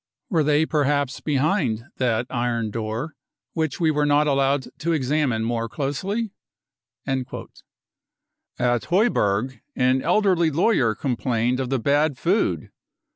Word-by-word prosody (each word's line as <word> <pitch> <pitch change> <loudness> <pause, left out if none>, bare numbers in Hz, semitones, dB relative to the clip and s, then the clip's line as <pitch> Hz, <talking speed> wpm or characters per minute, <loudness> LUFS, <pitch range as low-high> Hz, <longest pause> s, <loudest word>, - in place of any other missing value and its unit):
Were 165 -4 +3
they 150 +1 +3
per 150 -3 +1
haps 145 -2 0
behind 140 - 0
that 120 -2 +1
iron 120 -3 -1
door, 115 +8 -4 0.4
which 160 -4 -2
we 160 -2 +3
were 150 -1 +1
not 145 +1 +4
allowed 140 -1 +2
to 170 +1 0
examine 135 -5 0
more 115 0 -1
closely? 185 - -2 0.7
55 130 -2 -4 1.1
At 120 -1 +1
Heuberg 130 - +1
an 130 +1 +2
elderly 180 -1 +3
lawyer 150 - +2
complained 125 0 0
of 130 -2 -2
the 135 - +1
bad 145 +3 +1
food. 185 - 0
135 Hz, 130 wpm, -23 LUFS, 120-155 Hz, 1.1 s, not